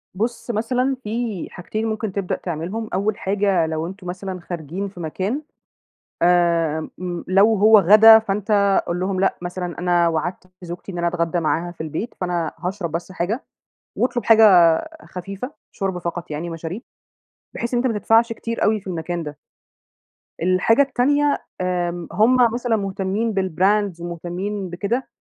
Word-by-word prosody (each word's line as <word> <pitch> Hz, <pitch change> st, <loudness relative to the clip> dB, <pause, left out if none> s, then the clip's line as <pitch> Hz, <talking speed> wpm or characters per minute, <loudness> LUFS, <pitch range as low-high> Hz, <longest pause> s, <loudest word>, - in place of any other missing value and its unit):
بُص، 235 Hz, +4 st, -2 dB
مثلًا 250 Hz, +4 st, 0 dB
في 220 Hz, -3 st, -3 dB
حاجتين 215 Hz, +5 st, -4 dB
ممكن 220 Hz, -2 st, -2 dB
تبدأ 195 Hz, -2 st, -2 dB
تعملهم، 180 Hz, +7 st, -4 dB
أول 200 Hz, +3 st, 0 dB
حاجة 195 Hz, -3 st, +1 dB
لو 160 Hz, +1 st, -3 dB
أنتم 190 Hz, 0 st, -9 dB
مثلًا 185 Hz, +1 st, -5 dB
خارجين 175 Hz, +3 st, -5 dB
في 185 Hz, -2 st, -13 dB
مكان، 190 Hz, -, -2 dB, 0.8 s
آمم 170 Hz, -3 st, +2 dB
م 175 Hz, -1 st, -5 dB
لو 200 Hz, +4 st, +4 dB
هو 215 Hz, +1 st, +7 dB
غدا 215 Hz, +4 st, +8 dB
فأنت 200 Hz, -1 st, +1 dB
قُل 175 Hz, +1 st, -2 dB
لهم 185 Hz, 0 st, -1 dB
لأ، 195 Hz, -, +2 dB
مثلًا 175 Hz, -1 st, -5 dB
أنا 175 Hz, -1 st, +3 dB
وعدت 165 Hz, +3 st, -2 dB, 0.2 s
زوجتي 175 Hz, +2 st, -7 dB
إن 175 Hz, -, -7 dB
أنا 170 Hz, 0 st, 0 dB
أتغدّى 170 Hz, 0 st, 0 dB
معاها 170 Hz, +2 st, -1 dB
في 175 Hz, -, -9 dB
البيت، 160 Hz, +9 st, -4 dB
فأنا 175 Hz, -3 st, -1 dB
هاشرب 180 Hz, -2 st, -3 dB
بس 170 Hz, +3 st, -4 dB
حاجة. 195 Hz, +8 st, -2 dB, 0.5 s
واطلُب 240 Hz, -3 st, -1 dB
حاجة 215 Hz, -6 st, +7 dB, 0.4 s
خفيفة، 195 Hz, +8 st, -7 dB, 0.2 s
شوربة 195 Hz, -3 st, -2 dB
فقط 170 Hz, 0 st, -5 dB
يعني 155 Hz, +3 st, -4 dB
مشاريب، 165 Hz, +6 st, -6 dB, 0.7 s
بحيث 235 Hz, +1 st, -3 dB
إن -, -, +3 dB
أنت 255 Hz, -, +1 dB
ما 210 Hz, -, -2 dB
تدفعش 225 Hz, +2 st, +3 dB
كتير 230 Hz, 0 st, -3 dB
أوي 215 Hz, 0 st, +2 dB
في 195 Hz, -, -27 dB
المكان 175 Hz, -1 st, -3 dB
ده. 150 Hz, -2 st, -7 dB, 1.1 s
الحاجة 185 Hz, +8 st, +3 dB
التانية، 285 Hz, +2 st, +2 dB, 0.2 s
آمم، 175 Hz, -1 st, -2 dB
هُم 235 Hz, +4 st, +4 dB, 0.2 s
مثلًا 240 Hz, -1 st, 0 dB
مُهتمين 195 Hz, +3 st, -2 dB
بالBrands 190 Hz, 0 st, +1 dB
مُهتمين 180 Hz, +3 st, -4 dB
بكده، 205 Hz, +9 st, -2 dB
190 Hz, 150 wpm, -21 LUFS, 175-215 Hz, 1.1 s, غدا